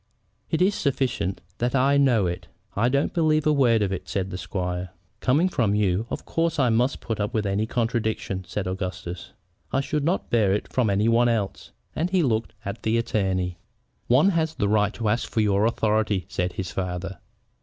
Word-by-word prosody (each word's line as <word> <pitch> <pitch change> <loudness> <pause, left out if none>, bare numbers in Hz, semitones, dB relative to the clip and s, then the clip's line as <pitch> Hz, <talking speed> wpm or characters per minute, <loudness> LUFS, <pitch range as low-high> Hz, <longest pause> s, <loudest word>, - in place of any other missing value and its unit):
"It 165 +2 +2
is 200 +2 +3
sufficient 130 - -1 0.2
that 120 +3 0
I 135 +2 +4
do - - +5
know 120 -7 +3
it." 90 0 -3 0.3
"I 115 +4 +2
don't 140 +2 +1
believe 155 -2 +2
a 155 - +4
word 120 -6 +4
of 100 - -1
it," 90 - -6
said 95 -1 -2
the 90 - -4
squire. 90 -2 -3 0.3
"Coming 150 +8 +3
from 115 - +1
you, 105 +1 +1
of - - -5
course 165 -1 0
I 130 -4 +3
must 120 +4 +1
put 110 -2 -3
up 105 +4 -2
with 110 -1 0
any 100 +2 0
contradiction," 110 -5 -1
said 100 0 -3
Augustus. 90 -2 -5 0.4
"I 135 - +2
should 145 +2 -1
not 175 +5 -1
bear 105 -5 +3
it 105 - -3
from 125 -4 +2
any 100 +2 +2
one 120 +1 +4
else," 105 -4 -2 0.3
and 165 +3 0
he 185 -2 +2
looked 115 -4 0
at 100 +3 -5
the 110 +1 +1
attorney. 95 -6 -1 0.5
"One 135 +10 +5
has 160 -3 0
a 100 - +2
right 105 0 +2
to 115 - -2
ask 115 +3 0
for 110 - +1
your 105 0 +3
authority," 110 -5 +1
said 90 0 -2
his 95 -2 -4
father. 90 0 -4
110 Hz, 200 wpm, -25 LUFS, 95-130 Hz, 0.5 s, do